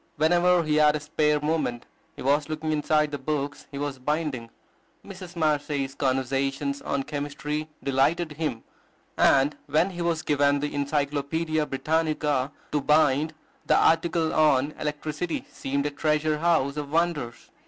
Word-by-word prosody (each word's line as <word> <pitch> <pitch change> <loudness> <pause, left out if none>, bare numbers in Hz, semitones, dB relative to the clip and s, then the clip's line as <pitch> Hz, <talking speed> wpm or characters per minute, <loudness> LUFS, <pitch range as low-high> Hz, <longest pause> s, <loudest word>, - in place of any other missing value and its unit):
Whenever 175 +3 +3
he 155 -1 +1
had 150 0 +5
a - - -1
spare 150 0 +1
moment, 150 -6 -1 0.3
he - - -8
was 145 +3 +2
looking 155 0 -2
inside 150 0 +1
the 145 - -4
books 145 +1 -3
he 140 - -7
was 140 -2 -3
binding. 145 -4 -2 0.6
Mrs. 185 -2 -10
Marcet's 145 -4 0
"Conversations 135 +1 -1
in 140 -1 -2
Chemistry" 150 +1 -4
delighted 140 +5 +1
him; 150 -6 -3 0.5
and 140 +2 +4
when 155 +6 +2
he 175 -1 -6
was 170 -2 0
given 145 -1 +2
the 145 +1 -3
"Encyclopedia 145 +2 -1
Britannica" 150 -2 0 0.2
to 150 - +1
bind, 150 +1 +3 0.3
the - - +4
article 165 0 +2
on 150 -2 +3
Electricity 150 +2 -3
seemed 140 +1 -2
a 145 - -1
treasure 150 +1 0
house 150 -4 +1
of 145 -1 -4
wonders. 160 -7 -1
150 Hz, 145 wpm, -26 LUFS, 140-155 Hz, 0.6 s, had